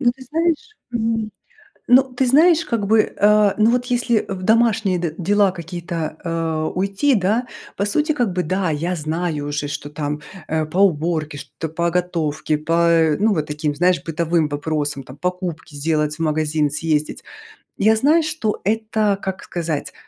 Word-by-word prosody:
Ну, 240 -3 +3
ты 260 +1 -15
знаешь, 335 - -1 0.2
м, 225 -1 -1 0.6
ну, 250 +2 +7
ты 260 +1 +1
знаешь, 315 +5 +5
как 225 -4 -1
бы, 220 0 +5
э, 210 -1 +4
ну 220 +2 +4
вот 250 0 0
если 240 -3 +1
в 185 -1 -4
домашние 220 -4 +2
д 165 -2 -3
дела 200 +2 +2
какие-то, 175 -1 -7 0.3
э, 165 -2 -2
уйти, 200 +9 +1
да, 215 +6 +1 0.3
по 200 - 0
сути, 300 +9 +1
как 245 -7 0
бы, 180 -1 0
да, 185 +2 -1
я 170 +5 -2
знаю 155 -1 -2
уже, 145 0 -2
что 145 0 -5
там, 150 0 -4 0.3
э, 155 0 0
по 175 +5 -3
уборке, 160 -4 +1
что-то 145 +3 -7
по 170 +2 -1
готовке, 160 -4 -1
по, 155 +2 -3 0.2
э, 160 -3 +3
ну 215 +1 +3
вот 155 -3 -1
таким, 150 0 -2
знаешь, 175 +3 +2
бытовым 165 -1 0
вопросам, 145 -1 -2
там 130 +3 -13
покупки 180 -3 -4
сделать, 150 0 0
в - - -28
магазин 155 -1 +1
съездить. 150 0 -2 0.5
Я 220 +2 +4
знаю, 305 +8 +3
что 305 -9 -2
это, 215 -1 +1
как 190 -1 -4
сказать? 165 -4 -4
180 Hz, 170 wpm, -20 LUFS, 155-220 Hz, 0.6 s, ну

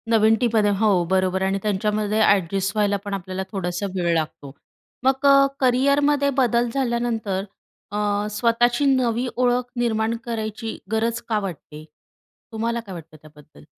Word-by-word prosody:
नवीन 220 -1 +4
टीममध्ये 225 -4 +2
हो, 200 -4 +3
बरोबर 190 0 +1
आहे 190 - +1
आणि 195 - -1
त्यांच्यामध्ये 210 +1 0
ॲडजस्ट 195 -1 +2
व्हायला 205 -1 +1
पण 205 - -4
आपल्याला 190 0 -4
थोडासा 180 0 -3
वेळ 175 -2 +1
लागतो. 155 -3 -3 0.5
मग 265 +2 +1
अ, 275 0 +7
करियरमध्ये 280 +3 +2
बदल 240 -2 +2
झाल्यानंतर 235 -6 -1 0.5
अ, 205 0 -1
स्वतःची 240 +4 +2
नवी 255 -2 +1
ओळख 245 0 +1
निर्माण 225 -1 0
करायची 225 -1 -4
गरज 230 +1 0
का 215 -2 +1
वाटते? 160 -5 -8 0.7
तुम्हाला 230 +1 -2
काय 210 -5 -9
वाटतं 155 -2 -11
त्याबद्दल? 150 - -18
220 Hz, 140 wpm, -22 LUFS, 195-240 Hz, 0.7 s, अ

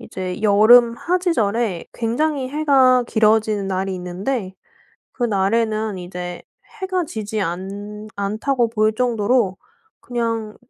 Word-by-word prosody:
이제 185 -4 -6
여름 230 +3 +6
하지절에 235 - 0
굉장히 265 +4 -1
해가 265 -4 +4
길어지는 215 -3 +2
날이 190 0 -2
있는데 185 +4 -4 0.6
그날에는 215 -1 0
이제 180 0 -7 0.4
해가 370 -2 -1
지지 215 -6 -4
않 200 +4 -5
않다고 225 +5 0
보일 215 -1 +1
정도로 230 -4 +1 0.4
그냥 230 -3 -3
220 Hz, 240 characters per minute, -20 LUFS, 200-245 Hz, 0.6 s, 여름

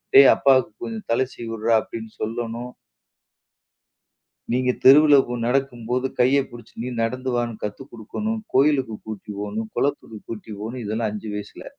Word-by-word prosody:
"டேய் 135 0 +10
அப்பாவுக்கு 130 -4 +3
கொஞ்சம் 225 -2 -6
தலை 120 +3 +3
சீவி 120 - -8
விடுறா" 115 +1 +1
அப்படின்னு 110 0 -8
சொல்லணும். 115 +2 -3 1.8
நீங்க 125 +1 +2
தெருவில 145 +2 +8
போ 120 - -4
நடக்கும் 125 -1 0
போது 125 +1 +1
கைய 130 +3 +5
புடிச்சு, 120 -2 -13
நீ 125 - -3
நடந்து 125 +3 -2
வான்னு 120 -2 -2
கத்து 105 +5 -4
குடுக்கணும். 215 - -4
கோயிலுக்கு 135 -5 +3
கூட்டி 105 -1 -7
போணும், 110 +2 -4
குளத்துக்கு 135 -6 -2
கூட்டி 110 -1 -7
போணும். 120 +2 -5
இதெல்லாம் 110 +1 -1
5 105 +1 -6
வயசுல. 105 0 -8
120 Hz, 150 wpm, -23 LUFS, 110-130 Hz, 1.8 s, டேய்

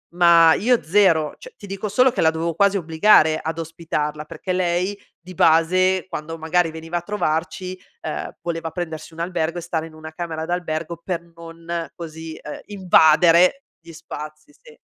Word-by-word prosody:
ma 170 -2 +6
io 245 +2 +2
0; 165 -3 +3
cioè - - -13
ti 205 - -11
dico 195 +2 -4
solo 255 +6 +4
che 240 - -2
la 160 - +4
dovevo 165 0 -3
quasi 200 +2 +3
obbligare 160 -1 +4
ad 160 +1 -4
ospitarla, 155 -2 -4
perché 185 +4 -5
lei 180 +2 0 0.2
di 180 +2 -12
base, 185 +4 +3
quando 165 +1 -6
magari 165 +1 +1
veniva 165 +2 -5
a - - -3
trovarci, 185 0 -3 0.2
ehm, - - -5
voleva 165 -1 -4
prendersi 160 -2 -6
un 165 - -12
albergo 170 -1 -2
e - - -7
stare 165 -1 -3
in 160 - -16
una 155 0 -10
camera 160 -1 -5
d'albergo 170 -1 -3
per 175 -3 -2
non, 165 0 -6
così, 160 -1 -8
uhm, 150 - -7
invadere 180 - +4 0.2
gli 165 0 -14
spazi 155 - -9
sì. 470 -2 -17
170 Hz, 170 wpm, -21 LUFS, 160-185 Hz, 0.2 s, ma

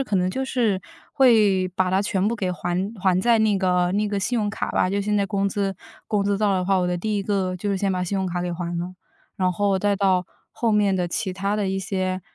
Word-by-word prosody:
呃， 270 - 0
可 210 - -1
能 185 0 +1
就 265 +6 -2
是 235 -7 +1 0.4
会 210 -8 +4
把 185 0 0
它 190 - +2
全 195 -1 0
部 235 - -2
给 190 -4 -1
还 175 0 -3 0.2
还 185 -1 +3
在 235 +2 +3
那 215 -2 +3
个 180 -1 +2
那 210 +1 +1
个 200 -1 -2
信 240 +5 0
用 210 -2 0
卡 200 - -3
吧 - - +1
就 200 - 0
现 210 +1 0
在 200 - +2
工 200 -1 0
资 195 0 -2 0.3
工 210 -2 0
资 200 0 +1
到 210 -1 +2
了 190 - +1
的 180 - -1
话， 195 -1 +3
我 180 - +1
的 180 - 0
第 210 +3 -1
1 200 - -1
个 190 -2 -1
就 205 +3 -3
是 195 - 0
先 195 0 0
把 180 -1 -1
信 195 +3 -2
用 190 - -1
卡 175 0 -2
给 175 -1 -2
还 170 0 -4
了。 180 +2 -4 0.4
然 185 -2 +1
后 195 +1 +1
再 205 +1 +1
到 190 -2 +2 0.3
后 235 - 0
面 205 -2 +3
的 180 -2 -1
其 190 +2 -2
他 195 +2 -1
的 200 -2 -1
一 195 - -1
些 185 -1 -2
195 Hz, 285 characters per minute, -23 LUFS, 185-205 Hz, 0.4 s, 会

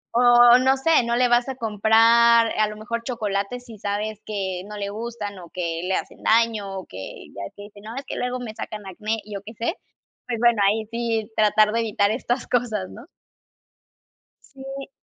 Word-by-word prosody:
o 240 0 +7
no 265 +1 +3
sé, 315 0 +3
no 235 0 0
le 250 +1 +3
vas 240 +2 +2
a 265 - -4
comprar, 230 +1 +4
a 215 - +4
lo 210 0 -8
mejor, 235 +2 -4
chocolate 215 -2 -2
si 235 -4 -13
sabes 205 +1 -3
que 190 -4 -3
no 210 - -7
le 200 -1 -3
gustan, 210 -2 -6
o 175 -2 -12
que 170 -2 -3
le 190 +1 0
hacen - - -5
daño, 220 -4 +1
o 185 - -10
que 95 +1 -9
ya 100 - -6
ves - - -10
que 205 - -10
dicen: 205 0 -13
"No, 220 +2 -8
es 275 +1 -6
que - - -6
luego 250 0 -2
me 235 -3 -6
sacan 210 -1 -7
acné", 210 +4 -3
y 210 - -10
yo 200 - -5
qué 220 +2 -10
sé, 235 +9 -1 0.5
pues 240 -2 -2
bueno, 235 -2 +4
ahí 215 +1 -1
sí 230 -2 -2
tratar 215 0 +4
de 230 - +1
evitar 210 -2 +1
estas 245 +2 -2
cosas, 220 -6 -1
¿no? 235 +6 -12 1.4
Sí. 270 0 -8
220 Hz, 205 wpm, -23 LUFS, 205-240 Hz, 1.4 s, o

